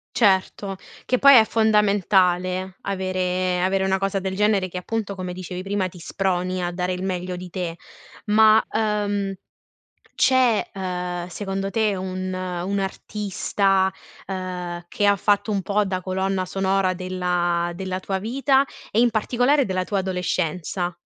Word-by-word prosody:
Certo, 195 -3 +2 0.3
che 255 - +1
poi 280 -1 +8
è 220 - +7
fondamentale 190 -4 +2
avere 185 -2 -1
avere 190 +1 +1
una 190 0 +2
cosa 195 0 -1
del 190 0 -3
genere 205 -2 +2
che 180 - -7
appunto, 205 +1 -3
come 185 -1 -5
dicevi 185 0 -6
prima, 195 -1 -1
ti 180 -1 -12
sproni 185 +1 -1
a 175 - -1
dare 180 +1 -2
il 180 0 -3
meglio 180 -1 -3
di 180 0 -8
te. 170 -2 -4 0.5
Ma, 215 +1 +6
uhm, 205 -2 0 0.8
c'è 255 -4 +3
ehm, 180 -2 -4
secondo 195 +1 -3
te 215 0 +1
un, 185 0 -4
un 185 +1 -3
artista 195 -1 0 0.4
ehm, 180 -2 -5
che 205 +1 +2
fatto 205 +2 +1
un 195 -2 0
po' 205 +2 +1
da 185 -1 -2
colonna 190 0 -1
sonora 195 0 +1
della 180 -1 -1
della 185 -1 -3
tua 190 0 -2
vita 265 +6 +2 0.3
e 215 - -1
in 240 0 +5
particolare 245 +6 +2
della 185 -3 -1
tua 200 0 -1
adolescenza? 180 -1 -2
190 Hz, 145 wpm, -23 LUFS, 180-205 Hz, 0.8 s, poi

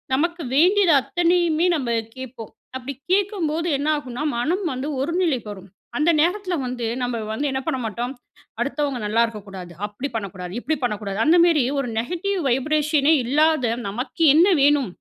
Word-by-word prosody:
நமக்கு 340 +5 -1
வேண்டியது 360 +3 +5
அத்தனையுமே 345 +1 +1
நம்ப 265 -6 -2 0.3
கேட்போம். 255 -4 -8 0.2
அப்படி 260 +2 -5 0.2
கேட்கும்போது 365 -5 0
என்னாகும்னா 290 -3 -2 0.2
மனம் 330 +11 0
வந்து 260 +3 -4
ஒரு 310 +5 -2
நிலைக்கு 270 -11 0
வரும். 195 -1 -13 0.3
அந்த 300 +3 +2
நேரத்தில 365 +3 0
வந்து 245 -1 -4 0.2
நம்ம 245 -1 -1 0.2
வந்து 280 +7 -1
என்ன 265 - -1
பண்ண - - -1
மாட்டோம், 240 +4 -3 0.5
அடுத்தவங்க 280 0 -1
நல்லாருக்கக்கூடாது, 210 -5 -2 0.2
அப்டி 210 +7 -5
பண்ணக்கூடாது, 185 -4 -5
இப்டி 315 +6 -1
பண்ணக்கூடாது 210 -4 -2
அந்தமேரி 335 -3 +5 0.2
ஒரு 275 - -2
நெகட்டிவ் 360 - -2
வைப்ரேஷனே 300 +3 +2
இல்லாத, 300 +1 +2 0.2
நமக்கு 250 +10 -3
என்ன 330 +5 +6
வேணும், 285 -2 +4
280 Hz, 140 wpm, -22 LUFS, 240-330 Hz, 0.5 s, என்ன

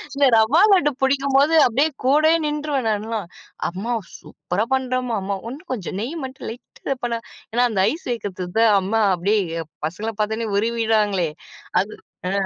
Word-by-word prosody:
இல்ல 280 0 +4
ரவா 240 +10 +4
லட்டு 295 -7 +4
பிடிக்கும்போது 275 +2 +3
அப்பிடியே 275 +6 +2 0.2
கூடயே 310 +4 +5
நின்றுவேன் 295 -5 -1
நான்லாம். 215 -2 -3 0.4
அம்மா 195 +7 -3 0.3
சூப்பரா 200 +5 -3
பண்ணுறம்மா! 255 -2 -1
அம்மா 200 0 -2
இன்னும் 290 +5 -9
கொஞ்சம் 190 -5 -5
நெய் 260 +9 -4
மட்டும் 265 0 -8
லைட்டா 235 +2 -9 0.2
இத 275 - +1
பண்ணா, 235 -1 0 0.3
ஏன்னா 245 +2 +2
அந்த 210 -4 -1
ஐஸ் 325 - -7
வைக்கிறதுக்கு 190 -4 -4
தான் 225 -2 +5
அம்மா 220 +4 0
அப்பிடியே 180 -2 0 0.3
பசங்கள 210 +7 -4
பார்த்தவுனே 220 +2 -1
உருகிருவாங்களே 215 -5 +1 0.5
அது. 210 +2 -6 0.3
ஆ. - - -1
230 Hz, 150 wpm, -22 LUFS, 205-270 Hz, 0.5 s, கூடயே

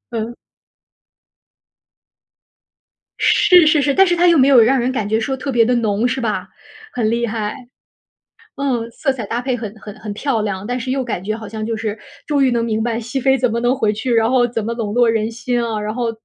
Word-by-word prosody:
嗯。 230 +2 -4 2.8
是 360 -5 +5
是 305 -1 +4
是， 280 0 +1
但 385 - +5
是 350 -2 +1
她 350 +1 +3
又 340 -2 +5
没 265 - +5
有 265 -4 +7
让 260 +4 +3
人 245 +2 0
感 220 -6 -3
觉 220 +1 +1
说 265 +4 -2
特 270 +2 -4
别 235 -2 +3
地 250 - +1
浓 220 0 +1
是 260 +1 -2
吧？ 220 -3 -2 0.4
很 225 -3 0
厉 235 +1 0
害。 215 -2 -3 1.0
嗯， 255 -5 -2
色 270 +3 -1
彩 240 -5 -6
搭 230 +4 -3
配 255 0 -1
很 220 -3 -6
很 210 -1 -10
很 215 -2 -6
漂 230 +1 -1
亮， 200 -1 -4
但 245 +1 -2
是 255 +2 -4
又 265 0 -1
感 215 -7 -4
觉 215 +2 -2
好 220 - -9
像 215 +1 -5
就 225 0 -3
是 220 -1 -3 0.3
终 285 -2 +2
于 260 - +3
能 235 -1 0
明 220 -1 -1
白 235 0 -1
熹 245 +4 -4
妃 265 +1 +3
怎 250 -1 +1
么 230 - -1
能 245 +1 +2
回 215 -5 +1
去， 235 +4 -2
然 225 0 +3
后 250 -1 +3
怎 230 -3 -4
么 235 - -2
笼 220 -3 -4
络 240 0 +3
人 225 0 0
心 240 +1 -2
啊， 225 -2 -2
然 210 +1 -4
后 240 -2 -1
235 Hz, 245 characters per minute, -18 LUFS, 220-260 Hz, 2.8 s, 有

